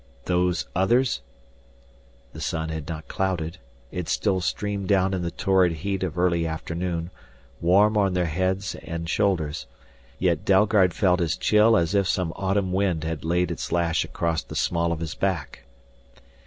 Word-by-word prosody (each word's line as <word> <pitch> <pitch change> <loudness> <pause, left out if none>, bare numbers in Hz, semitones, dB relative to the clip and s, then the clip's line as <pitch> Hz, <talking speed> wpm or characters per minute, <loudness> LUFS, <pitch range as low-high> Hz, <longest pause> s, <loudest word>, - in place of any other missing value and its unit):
"Those 90 -1 +1
Others?" 115 - +2 1.1
The - - -8
sun 80 0 -2
had 80 -2 -5
not 80 -2 -6
clouded, 90 -2 -2 0.3
it 90 -2 -4
still 95 -3 +1
streamed 100 +2 -2
down 95 -1 +2
in 95 - -1
the 85 - -2
torrid 95 -1 +2
heat 95 +5 -3
of 90 -2 -3
early 85 -2 +2
afternoon, 85 +2 -3 0.5
warm 100 +5 +4
on 100 -3 +2
their 90 -1 +1
heads 95 +4 -1
and 85 -1 -5
shoulders. 80 -7 0 0.5
Yet 85 -2 +1
Dalgard 100 -2 +4
felt 90 -3 +2
as 80 -2 0
chill 110 +1 +4
as 85 +2 +1
if 100 -2 +2
some 90 -3 0
autumn 95 -1 0
wind 95 -5 +1
had 80 -1 -4
laid 90 +1 +1
its 85 - -5
lash 85 -2 +1
across 85 -2 -1
the - - -10
small 85 -1 +1
of 85 -1 -3
his 80 -1 -3
back. 95 -9 -3
90 Hz, 160 wpm, -25 LUFS, 85-95 Hz, 1.1 s, warm